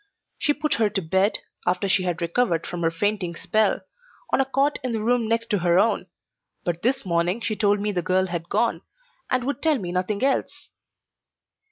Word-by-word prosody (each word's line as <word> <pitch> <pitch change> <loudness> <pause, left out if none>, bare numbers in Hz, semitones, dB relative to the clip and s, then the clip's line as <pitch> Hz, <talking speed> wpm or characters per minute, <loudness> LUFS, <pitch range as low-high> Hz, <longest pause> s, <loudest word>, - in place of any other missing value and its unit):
She 290 - +2
put 305 0 0
her 215 - +4
to 200 -1 -1
bed, 190 +5 +2 0.3
after 185 +3 +1
she 190 0 +3
had 175 -2 -2
recovered 170 -1 +1
from 175 - -5
her 165 - +3
fainting 180 0 -1
spell, 215 +5 +1 0.5
on - - +5
a - - +1
cot 275 +2 +1
in 250 -2 -2
the 220 -1 -2
room 240 0 +2
next 230 +1 0
to 205 - +2
her 175 0 +3
own, 205 -2 +2 0.6
but 170 -1 -2
this 260 +1 +1
morning 175 +3 +1
she 220 -2 -2
told 205 -1 +2
me 210 +1 -1
the 180 -3 -1
girl 185 +2 +2
had 170 -2 -5
gone, - - +1 0.5
and 255 -1 +1
would 280 +2 -3
tell 315 -3 +3
me 180 -6 -5
nothing 185 +5 -1
else. 270 0 -1
205 Hz, 200 wpm, -24 LUFS, 175-235 Hz, 0.6 s, on